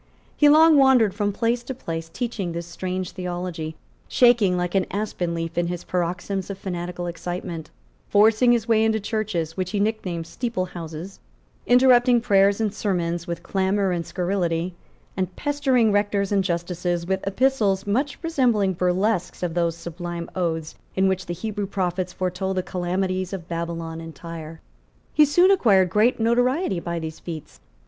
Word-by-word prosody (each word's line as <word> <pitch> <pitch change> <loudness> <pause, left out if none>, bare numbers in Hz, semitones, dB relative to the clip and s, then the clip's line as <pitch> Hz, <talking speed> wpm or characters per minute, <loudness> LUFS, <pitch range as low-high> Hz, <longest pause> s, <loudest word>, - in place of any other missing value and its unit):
He 295 - +5
long 315 +1 +7
wandered 255 -7 +5
from 205 0 0
place 230 +4 0
to 260 +2 -6
place, 165 -7 -5
teaching 205 -4 -3
this 170 0 -4
strange 185 +2 -4
theology, 175 -3 -4 0.3
shaking 230 -7 +4
like 180 0 -2
an 195 -1 +1
aspen 190 -4 -2
leaf 165 +1 -3
in 175 - 0
his 175 0 -4
paroxysms 185 +2 -2
of 195 - -5
fanatical 175 -2 -4
excitement, 175 -1 -5 0.4
forcing 220 +4 +5
his 235 -1 +1
way 220 -1 +4
into 220 0 +2
churches, 200 -7 -2
which 185 -1 -2
he 205 - -1
nicknamed 200 -6 -1
steeple 205 +2 -3
houses 170 +1 -8 0.5
interrupting 245 -1 +5
prayers 200 -2 +3
and 215 -3 0
sermons 175 -4 -2
with 170 -1 -4
clamour 195 0 +1
and 170 -1 -1
scurrility, 180 -2 -1 0.4
and 185 -1 -2
pestering 270 -6 +2
rectors 205 -1 +1
and 200 -1 +2
justices 175 -1 -2
with 190 +1 0
epistles 205 -3 +1
much 265 +7 0
resembling 240 - +2
burlesques 180 +2 0
of 175 -2 -1
those 170 -1 0
sublime 170 0 -6
odes 165 -3 -2 0.2
in 190 0 +3
which 190 -1 -1
the 175 - -2
Hebrew 205 +2 -3
prophets 185 -2 -2
foretold 185 +1 -2
the 185 - +1
calamities 185 +1 -2
of 175 -3 -6
Babylon 165 -1 -4
and 165 -1 -9
Tyre. 165 -1 -8 0.5
He 305 - +6
soon 350 +6 +5
acquired 195 - +4
great 230 +5 +3
notoriety 245 - +1
by 170 0 -4
these 160 -1 -5
feats. 160 -3 -8
185 Hz, 160 wpm, -23 LUFS, 175-220 Hz, 0.5 s, long